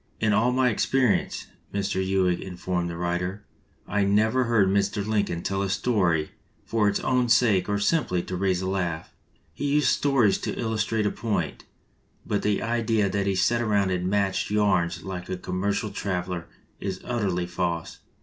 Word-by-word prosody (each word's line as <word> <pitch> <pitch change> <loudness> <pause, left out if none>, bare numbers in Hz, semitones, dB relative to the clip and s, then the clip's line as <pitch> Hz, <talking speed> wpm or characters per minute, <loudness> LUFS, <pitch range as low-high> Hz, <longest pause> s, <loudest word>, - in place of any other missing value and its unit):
"In 105 -1 +2
all 115 +4 +3
my 130 0 +3
experience," 130 +1 +1 0.3
Mr. 100 -1 -1
Ewing 95 -2 +1
informed 90 -1 -3
the 85 - -5
writer, 90 +3 -2 0.4
"I 105 -1 +1
never 110 +6 +2
heard 115 -5 +3
Mr. 100 +1 +1
Lincoln 100 -6 -1
tell 95 0 -1
a 100 - -1
story 90 -9 +1 0.3
for 110 -2 +2
its 100 - -1
own 125 -2 +1
sake 105 -6 +3
or 105 - +1
simply 100 - +1
to 95 - -5
raise 95 -1 0
a - - -2
laugh. 90 -4 -2 0.4
He 145 - -4
used 150 - +4
stories 135 -8 +3
to - - -4
illustrate 110 -1 0
a 105 - +1
point, 110 -2 -3 0.6
but 105 - -1
the 105 -1 0
idea 115 -3 +1
that 100 0 -1
he 100 - +1
sat 115 +6 +2
around 100 -4 +1
and 90 0 -1
matched 100 -1 0
yarns 100 -5 +1
like 90 -1 -6
a 95 - -2
commer 90 +2 -2
cial 100 +1 -2
traveler 90 -3 -3 0.3
is 95 -1 -4
utterly 100 -7 -1
false. 85 -2 -3
100 Hz, 170 wpm, -26 LUFS, 90-110 Hz, 0.6 s, used